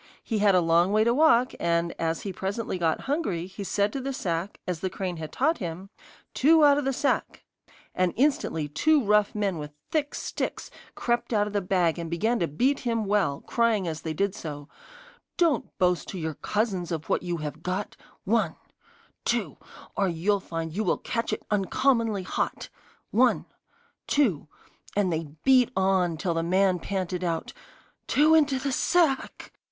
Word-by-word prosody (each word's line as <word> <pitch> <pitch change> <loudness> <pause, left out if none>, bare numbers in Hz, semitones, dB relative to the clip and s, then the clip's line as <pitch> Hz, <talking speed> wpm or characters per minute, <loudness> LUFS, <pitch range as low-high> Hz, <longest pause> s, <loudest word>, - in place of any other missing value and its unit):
He 220 -3 -1
had 200 -2 +4
a 180 - +5
long 170 +3 +3
way 215 +1 +4
to 235 +1 +3
walk, 255 -3 +4
and 170 0 +1
as 165 0 -1
he 195 - -4
presently 195 +1 -3
got 165 -2 +1
hungry, 270 - -2
he 190 +2 -8
said 200 +1 0
to 275 - -3
the 275 +1 -3
sack, 175 -3 -3
as 180 -3 -2
the 190 - -2
crane 180 -1 -4
had 155 -1 -6
taught 315 +5 +1
him: 180 +2 -6 0.4
'Two 310 +2 +5
out 285 0 +5
of 290 - -3
the 270 - +1
sack!' 270 +2 -1 0.5
And 185 -1 +1
instantly 250 - +1
two 290 - +2
rough 210 0 +3
men 200 -5 -1
with 150 0 -8 0.2
thick 300 -2 -1
sticks - - -4 0.2
crept 240 0 -1
out 205 -1 +3
of 210 - -6
the 205 - +1
bag 180 -3 +1
and 165 -1 -4
began 220 +8 0
to 170 - +1
beat 255 - +1
him 230 -3 -1
well, 195 -9 +1
crying 230 -6 +1
as 160 -1 -4
they 160 -1 -4
did 200 +3 0
so: 145 -6 -7 0.7
'Don't 335 -5 +2
boast 180 -2 +1
to 190 - -6
your 160 -2 -3
cousins 195 -2 -2
of 160 -1 -4
what - - +1
you 175 -1 -3
have 155 0 -6
got, 185 +4 -3 0.3
One - - +1 0.7
two - - -1 0.4
Or 200 - +1
you'll 185 +4 +1
find 165 -3 -5
you 215 - 0
will - - +1
catch 230 -2 -3
it - - -4
uncommonly 220 +1 +1
hot, - - -3 0.4
One - - +3 0.6
two 205 - +1 0.2
' - - -25
And 190 -4 +2
they 160 +1 -2 0.2
beat 260 -2 +5
on 190 -3 +2
till 170 +1 -1
the 165 - 0
man 185 +2 +2
panted 185 -1 -3
out: 165 -2 -2 0.5
'Two 305 +2 +4
into 290 -4 +4
the 275 +1 -2
sack. 310 0 +1
195 Hz, 180 wpm, -26 LUFS, 170-240 Hz, 0.7 s, a